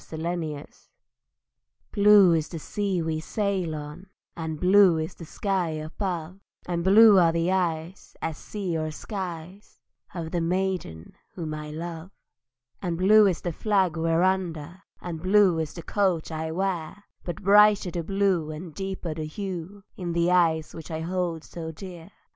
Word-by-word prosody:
TRUE 160 - -9 0.2
BLUE 155 -4 -5 1.3
Blue 205 -3 +6
is 160 -1 0
the 170 - -6
sea 190 +2 -2
we 160 -1 -2
sail 190 -2 -2
on, 150 +5 -8 0.3
And 160 -2 -5
blue 185 -1 +5
is 160 0 -3
the 165 - -11
sky 190 0 -1
above, 170 +3 -4 0.3
And 170 -1 -2
blue 205 +1 +7
are 170 -2 +5
the 170 +2 0
eyes 175 -1 -2
As 160 -1 -3
sea 195 -5 -4
or 155 0 -2
skies 180 +1 -7 0.4
Of 165 -2 -5
the 175 - -1
maiden 175 - -2 0.2
whom 160 -4 -4
I 150 0 -6
love: 165 +2 -6 0.7
And 175 -3 -2
blue 210 +3 +6
is 180 -4 -1
the 175 - -3
flag 190 -3 +1
we're 165 +1 +1
under, 180 -2 -1 0.2
And 165 -3 -6
blue 185 -2 +4
is 160 -2 -2
the 170 - -8
coat 185 -5 0
I 160 0 -3
wear; 185 +1 -3 0.2
But 175 +2 -6
brighter 205 -1 +5
the 170 - -3
blue, 195 -3 0
And 155 +1 -7
deeper 190 -3 -4
the 155 0 -5
hue 190 +3 -6
In 175 -2 -3
the 170 +1 +2
eyes 165 -3 +2
which 165 +1 -9
I 160 -1 -4
hold 170 -2 -2
so 165 -2 -7
dear! 175 0 -10
175 Hz, 160 wpm, -26 LUFS, 160-190 Hz, 1.3 s, blue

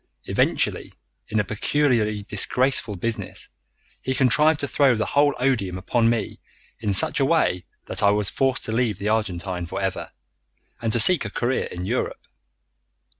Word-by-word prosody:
Eventually, - - 0 0.4
in 110 0 -1
a - - +2
peculiarly 110 -2 0
disgraceful 120 +2 +1
business, 115 +5 -4 0.5
he 130 - -2
contrived 150 +4 +4
to 140 - -2
throw 140 -3 +3
the 110 - -1
whole 145 0 +2
odium 115 -8 0
upon 115 +5 +1
me 115 -3 -2 0.4
in 105 - -1
such 95 - +4
a 135 - +3
way 135 - +1 0.2
that - - -4
I 100 - +5
was 105 -1 +1
forced 135 +3 0
to - - -4
leave 115 -4 0
the 105 - -2
Argentine 95 -5 -2
for - - -5
ever, - - -3 0.7
and 115 -1 -1
to 120 - 0
seek 180 +7 +4
a 110 - -4
career 120 +4 -1
in 90 +1 -6
Europe. 120 +6 -3
115 Hz, 165 wpm, -23 LUFS, 105-130 Hz, 0.7 s, I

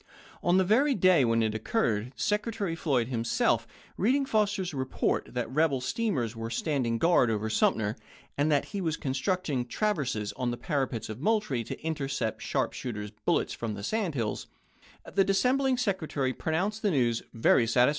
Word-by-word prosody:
On 175 +1 +3
the 190 - +5
very 260 +9 +3
day 185 -6 +5
when 115 -1 +2
it 110 -1 0
occurred, 110 - 0
Secretary 210 -4 -1
Floyd 135 -8 0
himself, 115 -2 +1 0.3
reading 270 +7 +2
Fos 215 -4 +1
ter's 185 -5 -3
report 130 -1 -1
that 125 - -1
rebel 150 -1 +2
steamers 130 - -1
were 115 0 -5
standing 125 -4 0
guard 165 -3 +4
over 110 0 -1
Sumter, 110 0 +2 0.4
and 145 +2 +1
that 145 - +2
he 200 - -2
was 160 -3 -1
constructing 140 0 -1
traverses 120 - -1
on 125 +2 -2
the 120 - -3
parapets 135 - -2
of 110 +1 -7
Moultrie, 205 - +1
to - - -6
intercept 140 -7 -2
sharp - - -1
shooters' 105 -4 -5
bullets - - +1
from 110 -3 -4
the 100 - -7
sand 195 - -1
hills, 115 -4 -2 0.6
the 195 - +2
dissem 195 +6 +2
aSfJmeS" - - +2
bling 265 -2 +2
Secretary 160 - -1
pronounced 190 - -1
the 210 - +2
news 120 -8 +1
"very 115 0 +3
satis 125 +3 +4
140 Hz, 175 wpm, -29 LUFS, 115-195 Hz, 0.6 s, the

